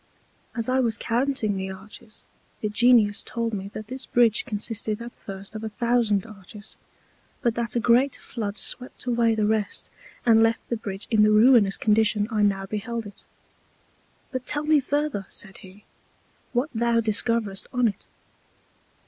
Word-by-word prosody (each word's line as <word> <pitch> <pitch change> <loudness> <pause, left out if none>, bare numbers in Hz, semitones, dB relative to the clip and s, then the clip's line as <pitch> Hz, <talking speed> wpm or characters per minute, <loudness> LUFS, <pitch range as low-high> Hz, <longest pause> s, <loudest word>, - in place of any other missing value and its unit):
As 230 -2 -2
I 255 +1 +2
was 230 -3 +1
counting 235 -3 0
the 190 0 -3
Arches, 195 +3 -12 0.4
the 210 - -1
Genius 215 -1 +4
told 230 -1 -3
me 195 -1 -4
that 215 - -6
this 260 +3 -8
Bridge 235 -3 +3
consisted 215 -2 -2
at 235 +1 -7
first 195 0 -9
of 215 0 -6
a 220 - -3
thousand 225 -2 +1
Arches; 210 -1 -12 0.7
but 235 - +2
that 235 +1 -3
a - - +3
great 245 +4 +3
Flood 210 -3 -5
swept 250 +4 -2
away 235 -2 +2
the 215 -1 +1
rest, 210 -1 -1 0.3
and 225 -2 +6
left 225 0 +1
the 235 - 0
Bridge 200 -3 -6
in 220 -2 +4
the 210 - +6
ruinous 215 -2 +5
Condition 215 -1 +2
I 215 -1 +1
now 195 -1 +1
beheld 225 +3 -4
it: 205 - -11 1.1
But 255 -2 -5
tell 295 0 -1
me 305 0 +4
further, 285 -7 -2
said 195 -2 -6
he, 195 +1 -15 0.7
what 260 +5 -1
thou 235 0 +2
discoverest 220 -2 0
on 245 -2 +2
it. 200 -2 -5
220 Hz, 165 wpm, -25 LUFS, 205-240 Hz, 1.1 s, and